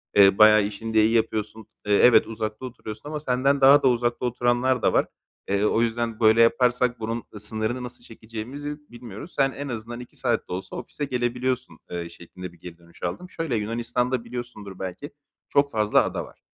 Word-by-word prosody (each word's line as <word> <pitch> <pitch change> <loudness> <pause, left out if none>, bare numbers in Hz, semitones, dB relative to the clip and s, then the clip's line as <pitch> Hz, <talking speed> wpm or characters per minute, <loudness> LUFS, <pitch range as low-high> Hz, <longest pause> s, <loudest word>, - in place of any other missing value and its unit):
eee, 100 -1 +7
bayağı 110 0 +7
işini 110 +2 -5
de 110 -1 +5
iyi 115 - +2
yapıyorsun, 110 -1 -1 0.2
eee, 105 - +1
evet, 115 -3 +6
uzakta 110 +2 -5
oturuyorsun 115 0 -8
ama 155 0 -3
senden 135 0 +1
daha 140 +2 +7
da - - +5
uzakta 120 0 +1
oturanlar 120 +1 +1
da - - +2
var; - - +3 0.4
eee, 100 +1 +1
o 110 - +2
yüzden 115 -1 -1
böyle 110 0 +5
yaparsak 120 +1 +3
bunun, 115 +1 -3
ııı, 105 - -8
sınırını 110 +4 -2
nasıl 125 0 -9
çekeceğimizi 115 +7 -7
bilmiyoruz. 120 - -10
Sen 135 -1 +3
en 140 +2 -6
azından 120 -1 -6
2 125 - -12
saat - - -1
de - - -4
olsa 95 +1 -6
ofise 145 - -5
gelebiliyorsun.", 125 0 -2
eee, 85 -1 -4
şeklinde 85 +1 -10
bir 85 - -20
geri 85 0 -10
dönüş 85 0 -19
aldım. 175 - -4
Şöyle, 165 -8 -3
Yunanistan'da, 120 +3 -1
biliyorsundur 115 -5 -8
belki, 95 +10 -6 0.4
çok 140 0 +2
fazla 105 -2 +3
ada - - -3
var. - - -18
115 Hz, 190 wpm, -25 LUFS, 110-125 Hz, 0.4 s, eee